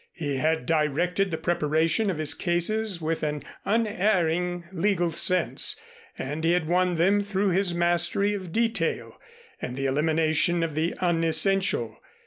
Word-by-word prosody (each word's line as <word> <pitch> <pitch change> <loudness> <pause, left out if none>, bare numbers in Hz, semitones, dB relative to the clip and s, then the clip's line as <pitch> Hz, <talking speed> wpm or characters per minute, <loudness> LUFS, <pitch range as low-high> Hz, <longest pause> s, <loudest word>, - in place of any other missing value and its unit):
He 145 -5 -3
had 160 +3 0
directed 165 +5 +1
the 160 - -3
preparation 160 +5 +1
of 180 - -2
his 155 -1 0
cases 190 +3 0
with 160 +1 -1
an 150 -1 -2 0.2
unerring 180 -5 +1
legal 180 -2 0
sense 180 +2 0 0.4
and 150 +4 -4
he 165 +1 +3
had 175 -3 0
won 180 +1 +2
them 195 +5 +3
through 200 0 0
his 185 -1 +1
mastery 175 +4 +2
of 185 -4 -6
detail 230 +3 -1 0.4
and 125 +1 -5
the 135 - -2
elimination 160 +4 +1
of 165 -2 -2
the 160 +3 -1
unessential. 170 - +1
175 Hz, 140 wpm, -26 LUFS, 160-190 Hz, 0.4 s, he